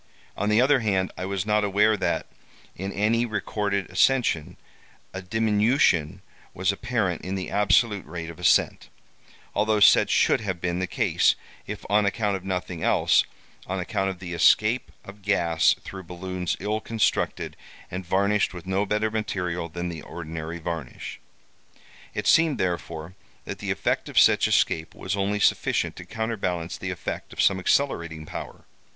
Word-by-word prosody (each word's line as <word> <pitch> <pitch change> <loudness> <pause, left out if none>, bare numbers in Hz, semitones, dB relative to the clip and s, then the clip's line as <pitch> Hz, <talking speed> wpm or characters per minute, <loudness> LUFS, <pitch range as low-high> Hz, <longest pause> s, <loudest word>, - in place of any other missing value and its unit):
On 105 +2 -1
the 105 +1 +4
other 130 +2 +4
hand, 95 -5 0
I 95 - -4
was 100 0 -2
not 105 0 +2
aware 105 +2 +3
that, - - -1 0.5
in 95 +2 -4
any 110 +4 +1
recorded 100 -3 -2
ascension, 120 - +2 0.6
a 95 - -5
diminution 105 - +2 0.3
was 95 +2 +1
apparent 100 -3 -1
in 95 +1 -4
the 95 -1 -4
absolute 105 +1 +2
rate 85 -1 -6
of 85 - -14
ascent; 90 - +2 0.6
although 105 +1 +2
such 100 - +6
should - - +3
have 95 -5 -3
been 85 0 -1
the 95 - -1
case, - - +2 0.3
if - - -6
on 105 0 +3
account 105 0 0
of 95 - -6
nothing 90 -3 -4
else, - - +3 0.4
on 95 +1 -2
account 95 +2 -1
of 95 - -5
the 90 -1 -7
escape 110 +7 +3
of 100 +1 -12
gas 85 -5 +3
through 95 - -8
balloons 90 0 -4
ill 105 +2 -2
constructed, 115 -1 -1 0.4
and 95 +1 -4
varnished 100 +2 +1
with 90 - -8
no 95 +2 0
better 105 +2 0
material 90 -6 -2
than 85 +2 -4
the 80 -2 -6
ordinary 80 0 -6
varnish. 80 -5 -6 1.0
It - - -3
seemed, 160 -4 +4
therefore, 85 -2 -3 0.3
that - - -6
the - - -5
effect - - -1
of - - -8
such - - +6
escape 80 0 +1
was - - -3
only 100 +1 0
sufficient - - +1
to - - -9
counterbalance 90 -7 -3
the - - -4
effect - - -5
of - - -13
some 95 -1 +3
accelerating 85 - 0
power. - - -8
95 Hz, 160 wpm, -25 LUFS, 90-105 Hz, 1.0 s, such